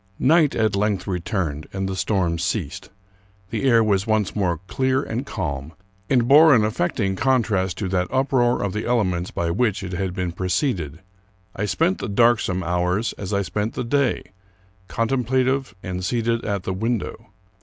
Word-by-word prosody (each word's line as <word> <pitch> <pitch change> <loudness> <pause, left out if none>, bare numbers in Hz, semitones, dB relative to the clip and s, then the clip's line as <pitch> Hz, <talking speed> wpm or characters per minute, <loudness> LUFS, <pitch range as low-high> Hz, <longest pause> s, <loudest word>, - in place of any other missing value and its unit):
Night 155 0 +3
at 110 -2 +1
length 100 -2 0
returned, 90 -5 -3
and 95 0 -3
the 95 - -3
storm 90 -3 0
ceased. - - -3 0.6
The - - -2
air 115 -2 +5
was 100 -2 +1
once 110 -3 0
more 90 -6 0
clear 130 +7 0
and 125 +5 -4
calm, 75 -5 -4 0.4
and 120 -3 +3
bore 150 +2 +8
an 110 -3 +3
affecting 95 -1 -1
contrast 105 -7 +1
to 100 - -2
that 90 -1 0
uproar 130 -3 +1
of 100 -2 -2
the 105 - -2
elements 95 -8 0
by 85 -1 -2
which 105 +1 0
it 95 - -5
had 95 0 -3
been 90 -3 -2
preceded. 90 - -2 0.5
I 105 - -2
spent 165 - +1
the - - -4
darksome 105 -4 +2
hours, 90 +5 0
as 100 -1 -5
I 100 -1 +1
spent 105 +4 -3
the - - -2
day, 135 +1 +1 0.6
contemplative 130 0 0
and 90 0 -4
seated 115 +2 0
at 100 -3 -2
the 95 - -2
window. 110 +2 -3
105 Hz, 165 wpm, -22 LUFS, 90-120 Hz, 0.6 s, bore